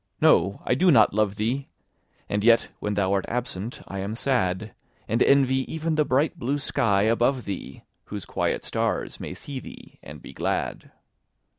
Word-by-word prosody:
—no! 95 +4 +4
I - - +2
do 180 +8 +3
not 115 - +6
love 105 -1 +1
thee! 120 +6 -2 0.6
And 105 0 -1
yet 115 0 +5
when 105 0 -2
thou 100 -1 +1
art 100 -1 0
absent 120 -3 -4
I 100 - -5
am 100 +3 -3
sad; 110 -6 0 0.3
And 115 +3 0
envy 135 -1 +4
even 160 0 -1
the 155 -1 +2
bright 150 +6 +1
blue 140 +2 0
sky 115 -8 +1
above 120 +3 +2
thee, 100 -2 -6 0.2
Whose 100 -3 -6
quiet - - -1
stars - - -2
may - - -6
see 140 -2 -6
thee - - -13
and 75 +1 -10
be - - -12
glad. - - -2
115 Hz, 170 wpm, -25 LUFS, 100-135 Hz, 0.6 s, not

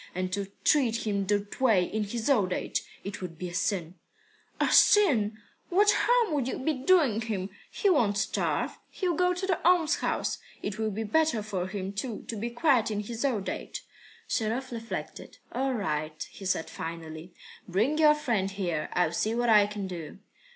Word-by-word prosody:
And 185 0 -2
to 200 0 -2 0.2
treat 240 -7 +2
him 200 -2 -1
that 205 +3 -1
way 220 -8 +5
in 210 +4 -2
his 220 +2 -4
old 205 -10 +3
age - - -2 0.2
it 200 0 -6
would 170 -3 -6
be 180 +1 -5
a - - -10
sin." 180 -2 -2 0.6
"A - - +2
sin! 235 - +5 0.3
Why, 360 - -2
what 415 +1 +6
harm 480 -7 +3
would 275 -4 0
you - - -2
be 310 +4 0
doing 270 - +3
him? 205 -4 -3 0.2
He 410 - -1
won't 230 - +3
starve. 215 - -1
He'll 365 -3 -1
go 360 +2 +2
to 370 +2 -3
the 370 -3 -1
almshouse. 340 -2 +2 0.2
It 205 +1 -4
will 220 -1 0
be 215 +2 -3
better 235 0 +1
for 190 -4 -3
him, 195 0 -4
too, 215 +1 -4
to 230 - -3
be 225 +3 -3
quiet 240 -2 +2
in 210 -1 -2
his 230 +3 -5
old 230 -8 0
age." - - -5 0.4
Sharov 240 +4 -1
reflected. 230 -1 -6
"All 265 +1 0
right," 155 -6 -3
he 195 - -10
said 175 -3 0
finally. 165 +1 -7 0.3
"Bring 225 - +1
your 300 -1 +6
friend 235 -10 0
here. 175 -6 -2
I'll 180 -3 +2
see 220 +6 0
what 240 0 +1
I 210 -2 +6
can 205 -1 -5
do." 175 -2 -7
215 Hz, 185 wpm, -28 LUFS, 190-270 Hz, 0.6 s, what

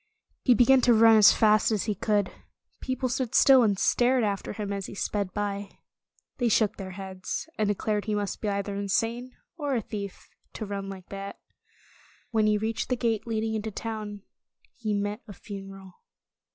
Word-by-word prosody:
He 250 - +5
began 255 +3 +5
to 240 -1 +5
run 225 0 +7
as 210 - +8
fast 215 0 +3
as 210 -3 0
he 215 - -1
could. 205 0 0 0.5
People 260 0 -2
stood 255 -1 -2
still 265 -2 +7
and 205 -4 +2
stared 245 +4 +3
after 200 -2 -2
him 205 -1 -4
as 195 -1 -4
he - - -9
sped 200 -1 -2
by. 200 -1 -4 0.6
They 240 -2 +2
shook 215 -1 +2
their 195 -2 -6
heads, 190 +6 -5
and 215 - +2
de 205 - +1
clared 210 +1 -1
he 215 - -1
must 205 -1 -3
be 210 - -1
either 200 0 -2
insane 225 +5 -2 0.2
or 290 -4 -1
a 235 - 0
thief, 200 -2 -7 0.3
to 220 - -5
run 200 -1 -5
like 190 -2 -10
that. 195 0 -7 0.9
When 220 -2 +2
he 210 0 +3
reached 220 +2 -2
the 250 - +2
gate 225 -2 -1
leading 220 -1 -1
into 220 0 -2
town, 215 -2 -6 0.5
he 215 -4 -2
met 205 +1 -2
a 205 - -9
funeral. 195 -1 -10
210 Hz, 185 wpm, -27 LUFS, 200-225 Hz, 0.9 s, as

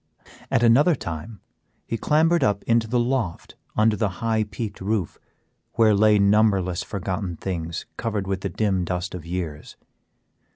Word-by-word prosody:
At 115 - +2
another 140 +9 +5
time 95 - -7 0.4
he - - -3
clambered 160 +7 +2
up 100 -1 +1
into 115 -1 +2
the 120 +2 +1
loft 120 -8 -2 0.2
under 110 0 +3
the 105 0 0
high 110 -1 0
peaked 105 0 -6
roof, 100 -3 -2 0.5
where 110 -2 +4
lay 105 +1 +5
numberless 100 -3 +3
forgotten 95 -2 -4
things 85 -3 -4
covered 105 -4 -2
with 95 -1 -2
the 100 - -2
dim 95 0 0
dust 90 +2 -3
of 85 -2 -7
years. 85 -4 -5
105 Hz, 150 wpm, -24 LUFS, 90-115 Hz, 0.5 s, another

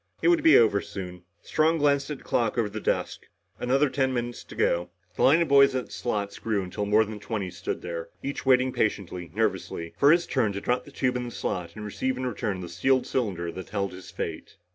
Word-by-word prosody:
It - - +5
would 340 -2 +4
be 320 +1 +7
over 105 -3 +4
soon. 90 -2 -8 0.2
Strong 160 +1 +2
glanced 140 -1 +2
at 150 - -3
the - - -18
clock 115 -1 0
over 115 -3 +2
the 110 +1 -5
desk. - - -2 0.3
Another 135 +4 +2
ten 130 -1 0
minutes 120 -1 -3
to - - -11
go. 85 +1 +1 0.3
The - - -3
line 160 +5 +6
of - - -4
boys 140 -1 +6
at 130 - -1
the - - -19
slots 105 -4 -3
grew 105 -4 -1
until 95 +3 -4
more 110 +2 +4
than 105 0 -7
twenty 100 -3 -4
stood 90 +1 -5
there, 85 -1 -5
each 140 +1 -4
waiting 130 -1 +3
patiently, 90 -5 -2
nervously, 95 -6 -2
for 140 - +7
his 170 +1 +4
turn 115 -7 0
to 100 - -4
drop 125 +3 0
the 145 - -13
tube 130 -2 0
in 125 - -3
the - - -5
slot 90 -6 -4
and 105 -1 -7
receive 130 +5 -2
in 130 - -3
return 105 -5 -2
the 90 - -6
sealed 130 +10 +2
cylinder 95 -9 -2
that 95 +2 -8
held 100 -1 -2
his 95 0 -11
fate. - - -6
110 Hz, 230 wpm, -26 LUFS, 95-130 Hz, 0.3 s, be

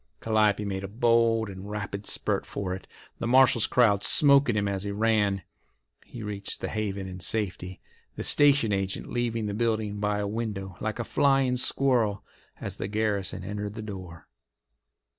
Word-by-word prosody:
Calliope 105 -2 +2
made 95 -1 -3
a - - -4
bold 115 +1 +2
and 95 +1 -8
rapid 105 -1 -5
spurt - - 0
for 95 -2 -4
it, 95 - -8 0.3
the 115 - -2
marshal's 125 -2 +5
crowd 105 -5 +3
"smoking" 140 0 +5
him 100 -1 0
as 100 -1 -2
he 100 - -3
ran. 105 -2 +1 0.6
He 120 - -9
reached 100 -1 -5
the - - -4
haven 100 -3 -3
in 90 0 -8
safety, 95 -2 -2 0.4
the - - -5
station 140 -7 +4
agent 95 0 -2
leaving 115 -2 -1
the 105 - -3
building 110 -2 -1
by 105 0 0
a 105 - -2
window, 100 -4 -4
like 110 0 -2
a 120 - -2
flying 135 0 +2
squirrel, 120 -6 +2 0.4
as - - -6
the - - -2
garrison 105 -3 -2
entered 105 +1 -5
the 110 - -6
door. 95 -5 -9
105 Hz, 165 wpm, -27 LUFS, 100-115 Hz, 0.6 s, marshal's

